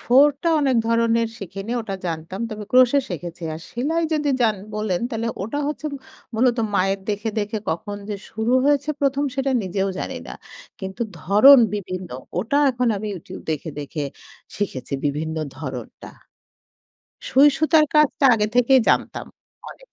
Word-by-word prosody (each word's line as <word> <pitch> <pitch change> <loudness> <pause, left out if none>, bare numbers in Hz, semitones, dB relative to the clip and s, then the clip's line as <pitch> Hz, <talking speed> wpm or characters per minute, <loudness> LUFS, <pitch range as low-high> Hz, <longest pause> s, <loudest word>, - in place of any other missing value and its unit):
ফোঁড়টা 285 +5 +4
অনেক 265 -3 +2
ধরনের 230 0 +2
শিখিনি। 195 +4 -6
ওটা 205 -3 -5
জানতাম। 165 +4 -5
তবে 210 -1 -6
crochet 255 +2 +5
শিখেছি। 175 0 -6
আর 160 - -8
সেলাই 310 +8 -1
যদি 300 -2 0
যান 220 -4 +3 0.2
বলেন 210 -4 -1
তাহলে 230 0 -2
ওটা 225 +8 -3
হচ্ছে 305 +1 -4 0.5
মূলত 240 +2 +3 0.2
মায়ের 195 +1 +1
দেখে, 210 +2 -2
দেখে 210 +1 -2
কখন 205 +5 -4
যে 210 - -2 0.2
শুরু 220 +2 -1
হয়েছে 290 +1 +2
১ম 280 +1 +1
সেটা 270 0 0
নিজেও 195 +1 -1
জানি - - -4
না। - - -8 0.5
কিন্তু 190 +2 -7 0.2
ধরন 215 - +7 0.2
বিভিন্ন। 185 -2 -5 0.3
ওটা 225 +9 +1
এখন 245 -1 0
আমি 215 +2 -5
YouTube 175 - -9
দেখে 155 +1 -3
দেখে 145 +1 -5 0.5
শিখেছি 150 -10 -4
বিভিন্ন 155 +3 -2 0.2
ধরনটা। 130 -4 -7 1.2
সুইসুতার 300 +3 +5
কাজটা 300 -1 +3
আগে 210 -2 +1
থেকেই 255 +1 +5
জানতাম - - 0 0.4
অনেকটাই। - - -15
220 Hz, 145 wpm, -22 LUFS, 190-270 Hz, 1.2 s, ধরন